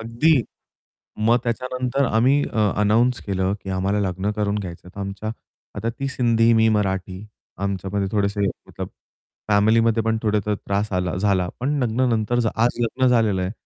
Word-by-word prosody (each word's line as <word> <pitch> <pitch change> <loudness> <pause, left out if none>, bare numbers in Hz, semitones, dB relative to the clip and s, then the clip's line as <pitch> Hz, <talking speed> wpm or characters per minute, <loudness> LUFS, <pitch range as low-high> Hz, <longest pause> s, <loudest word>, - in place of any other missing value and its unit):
अगदी. 120 +5 +2 0.9
मग 120 +1 +5
त्याच्यानंतर 125 +3 -1
आम्ही 130 +5 +3
अ, 105 -3 +2
अनाउन्स 115 +4 +3
केलं, 95 -1 0
की 95 - -6
आम्हाला 95 +2 0
लग्न 95 +3 -2
करून 105 -1 0
घ्यायचं. 90 -2 -8
तर 100 - -7
आमच्या, 100 +2 -4 0.4
आता 110 +3 -2
ती 135 - -1
सिंधी, 115 -3 +2
मी 110 0 +4
मराठी. 95 -2 -1 0.4
आमच्यामध्ये 100 0 -2
थोडेसे 100 -1 0 0.3
मतलब - - -6 0.6
फॅमिलीमध्ये 110 +2 +3
पण 110 0 +1
थोडासा 105 -1 +1
त्रास 100 +1 -2
आला 90 -2 -1
झाला, 95 -2 +1
पण 140 +4 0
लग्नानंतर 120 -1 +1 0.2
आज 120 +2 +1
लग्न 130 +3 +1
झालेलं 110 -6 +2
आहे. 90 +1 -2
110 Hz, 150 wpm, -22 LUFS, 100-115 Hz, 0.9 s, मग